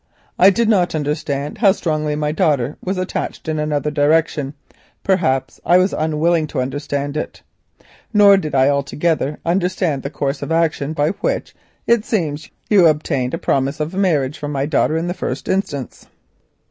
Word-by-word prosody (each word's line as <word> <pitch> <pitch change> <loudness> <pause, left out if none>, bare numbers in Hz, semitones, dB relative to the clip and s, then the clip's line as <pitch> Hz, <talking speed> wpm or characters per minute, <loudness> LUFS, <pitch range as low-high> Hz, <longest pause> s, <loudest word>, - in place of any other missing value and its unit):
I 190 - +8
did 225 +4 +1
not 185 -6 +2
understand 145 0 -3
how 200 -4 +5
strongly 155 -5 -1
my 150 0 -1
daughter 145 -4 +1
was 190 +1 -2
attached 185 -2 -4
in 155 -1 -1
another 150 -1 -1
direction, 150 -1 +1 0.5
perhaps 135 -10 0
I 175 - +5
was 185 +2 +2
unwilling 160 +1 +1
to - - -4
understand 140 +2 -3
it. 155 - -5 0.7
Nor 205 -2 +6
did 155 -7 -3
I 130 0 +4
altogether 145 +1 0
understand 175 -4 0
the 140 - -4
course 140 -1 -3
of - - -5
action 160 -3 0
by 150 0 +1
which - - -3 0.3
it 235 -2 +3
seems 155 -10 -2 0.2
you 195 -5 +6
obtained 145 -4 0
a - - -4
promise 135 +2 -1
of 155 +3 -3
marriage 155 -8 0
from 145 0 -4
my 140 -1 -1
daughter 155 +1 +1
in 165 - -2
the 175 - -2
first - - -4
instance. 145 - -3
155 Hz, 165 wpm, -19 LUFS, 145-175 Hz, 0.7 s, I